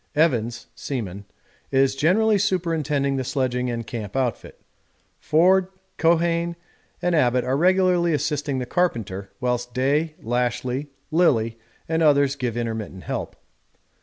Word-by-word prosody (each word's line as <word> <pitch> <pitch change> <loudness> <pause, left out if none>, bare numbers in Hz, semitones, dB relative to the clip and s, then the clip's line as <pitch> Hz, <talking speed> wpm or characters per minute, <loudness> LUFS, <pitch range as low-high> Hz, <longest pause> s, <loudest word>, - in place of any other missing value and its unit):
Evans 120 -7 +1
(seaman) 105 -7 -5 0.4
is 135 0 +2
generally 205 +9 +3
superintending 155 -7 0
the 130 - -1
sledging 125 -1 -1
and 115 -1 -3
camp 110 -3 -6
outfit. 130 -5 -2 0.6
Forde, 180 +4 +3 0.3
Keohane, 170 +1 +2 0.5
and 175 0 +2
Abbott 125 -5 +3
are 130 +1 0
regularly 180 +1 +3
assisting 150 -2 -1
the 125 - -2
carpenter, 110 - -1
whilst 125 -1 -2
Day, 145 +5 +1
Lashly, 125 +3 -1 0.2
Lillie, 115 -9 +2 0.3
and 160 0 0
others 140 -3 +4
give 125 -4 -3
intermittent 110 -5 -4
help. - - -4
135 Hz, 120 wpm, -23 LUFS, 120-165 Hz, 0.6 s, others